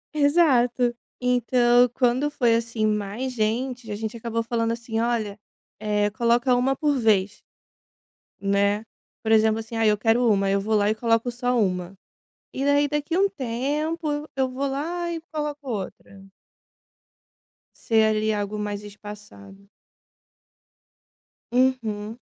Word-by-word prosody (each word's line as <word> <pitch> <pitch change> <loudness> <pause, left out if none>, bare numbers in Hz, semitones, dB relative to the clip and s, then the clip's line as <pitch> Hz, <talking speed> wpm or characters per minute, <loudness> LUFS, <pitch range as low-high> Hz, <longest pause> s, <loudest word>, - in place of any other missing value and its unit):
Exato. 255 -6 +3 0.2
Então, 245 0 +3
quando 255 +3 +1
foi 245 -6 +2
assim 230 -1 0
mais 215 +5 -2
gente, 240 +1 -2
a 205 - -2
gente 220 +1 -5
acabou 230 0 -3
falando 230 -1 -1
assim: 230 -1 -3
"Olha, 225 -3 -1 0.4
eh, 210 -1 0
coloca 240 +3 +2
1 265 +2 +1
por 290 0 +1
vez". 210 -3 +2 1.0
Né. 200 +1 +1 0.4
Por 220 - -1
exemplo 220 0 +4
assim, 225 +1 -7
ah, 225 - +1
eu 210 0 +3
quero 230 +3 +2
1. 195 -2 +2
Aí 195 - +2
eu 200 - +1
vou 215 +2 0
lá 205 0 +3
e 215 - +1
coloco 230 +1 +1
só 245 0 -1
1. 180 -2 -1 0.6
E 270 - -2
daí 285 0 +3
daqui 295 +4 -1
um 395 +1 +3
tempo, 295 +3 -2
eu 295 +1 -4
eu 265 -1 +1
vou 265 +2 -2
lá 340 +6 -3
e 330 - -4
coloco 295 -2 -4
outra. 195 -2 -6 1.6
Ser, 220 -1 +2
ali, 215 0 +1
algo 205 0 -3
mais 205 0 -4
espaçado. 205 -1 -12 1.8
Uhum. 235 -4 0
230 Hz, 140 wpm, -24 LUFS, 210-260 Hz, 1.8 s, exemplo